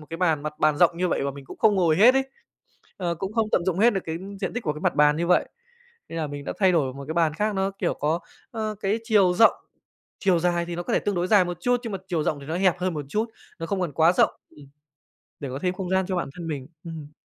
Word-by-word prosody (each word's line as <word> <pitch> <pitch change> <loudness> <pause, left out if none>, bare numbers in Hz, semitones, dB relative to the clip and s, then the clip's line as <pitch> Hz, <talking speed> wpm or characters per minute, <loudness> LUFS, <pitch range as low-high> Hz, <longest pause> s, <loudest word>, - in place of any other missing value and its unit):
một 150 - -13
cái 165 - -4
bàn, 165 -4 +1
mặt 150 +1 -3
bàn 155 -1 +3
rộng 170 +1 +4
như 180 +1 0
vậy - - 0
và 140 - -1
mình 140 0 -11
cũng - - -11
không 210 - +4
ngồi 170 -5 +3
hết 230 +8 +7
ấy. 270 0 +2 0.7
Ờ, 175 -3 -2
cũng 190 +5 -5
không 225 -1 +1
tận 170 - +1
dụng 185 -1 0
hết 235 +2 +5
được 195 - -1
cái 160 0 -3 0.2
diện 190 - -2
tích 245 - -4
của 150 - -1
cái 150 - -9
mặt - - +1
bàn 150 0 +5
như 170 - -1
vậy, 180 - +3 0.6
nên 165 - -5
là 160 - -1
mình 145 -1 -7
đã - - -3
thay 190 -2 +4
đổi 140 -7 +1
một 140 0 -8
cái 160 - -3
bàn 165 -3 +2
khác 210 +4 -1
nó, 195 0 0
kiểu, 195 - -2
có, 155 +4 -1 0.3
ơ, 215 -2 -3
cái 205 +3 0
chiều 195 -5 +4
rộng, 225 +4 +6 0.7
chiều 190 -5 +2
dài 175 0 0
thì 170 0 -5
nó 175 - -3
có - - -4
thể - - +4
tương 205 - -1
đối 175 0 0
dài 200 -1 +5
một 175 -1 -4
chút, 245 +4 +1
nhưng 225 -3 -5
mà 195 - -3
chiều 170 -4 0
rộng 150 -1 -1
thì 140 - -11
nó 160 +3 -3
hẹp 185 -2 +2
hơn 180 -1 -1
một 150 -1 -4
chút, 215 +9 0 0.3
nó 165 - -4
không 195 +2 -2
còn 175 -5 -2
quá 160 +4 +4
rộng, - - +4 0.2
ừm, 145 -1 -15 0.7
để 140 - -4
có 130 +1 -5
thêm 180 -1 0
không 185 -1 -5
gian 190 -1 +2
cho 190 - -2
bản 175 - -2
thân 170 -2 -7
mình. 145 -5 -4 0.2
Ừm. 155 -3 -8
175 Hz, 295 wpm, -25 LUFS, 155-195 Hz, 0.7 s, hết